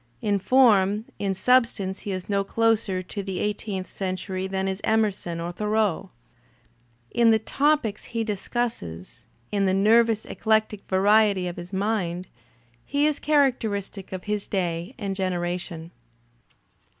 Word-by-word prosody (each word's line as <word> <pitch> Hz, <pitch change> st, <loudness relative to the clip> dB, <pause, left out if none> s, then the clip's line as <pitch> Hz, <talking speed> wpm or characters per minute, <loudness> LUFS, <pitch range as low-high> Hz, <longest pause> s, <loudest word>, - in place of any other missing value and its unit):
In 205 Hz, -, 0 dB
form, 210 Hz, -2 st, +4 dB
in 195 Hz, -1 st, 0 dB
^ -, -, -9 dB
substance 230 Hz, -4 st, +2 dB
he 205 Hz, -, -5 dB
is 185 Hz, -1 st, -4 dB
no 200 Hz, -1 st, +1 dB
closer 220 Hz, -3 st, +1 dB
to 200 Hz, +3 st, -5 dB
the 190 Hz, -2 st, -5 dB
eighteenth 205 Hz, -2 st, -2 dB
century 185 Hz, 0 st, -4 dB
than 190 Hz, 0 st, -2 dB
is 190 Hz, +1 st, -3 dB
Emerson 205 Hz, -6 st, 0 dB
or 170 Hz, +1 st, -3 dB
Thoreau. 210 Hz, -2 st, 0 dB, 1.0 s
In 235 Hz, -1 st, +4 dB
the 220 Hz, -, +6 dB
topics 275 Hz, -2 st, 0 dB
he 230 Hz, -1 st, -2 dB
discusses, 190 Hz, -, -4 dB, 0.2 s
in 200 Hz, -1 st, +1 dB
the 190 Hz, -, +2 dB
nervous 220 Hz, +2 st, +4 dB
eclectic 215 Hz, -2 st, 0 dB
variety 200 Hz, 0 st, +4 dB
of 175 Hz, -1 st, -5 dB
his 175 Hz, +1 st, -8 dB
mind, 190 Hz, -3 st, -1 dB, 0.6 s
he 285 Hz, +1 st, +1 dB
is 305 Hz, -1 st, +1 dB
characteristic 225 Hz, -10 st, 0 dB
of 185 Hz, -1 st, -5 dB
his 210 Hz, -1 st, -2 dB
day 175 Hz, +3 st, -2 dB
and 200 Hz, -4 st, -3 dB
generation. 175 Hz, -3 st, -3 dB
200 Hz, 140 wpm, -25 LUFS, 185-220 Hz, 1.0 s, the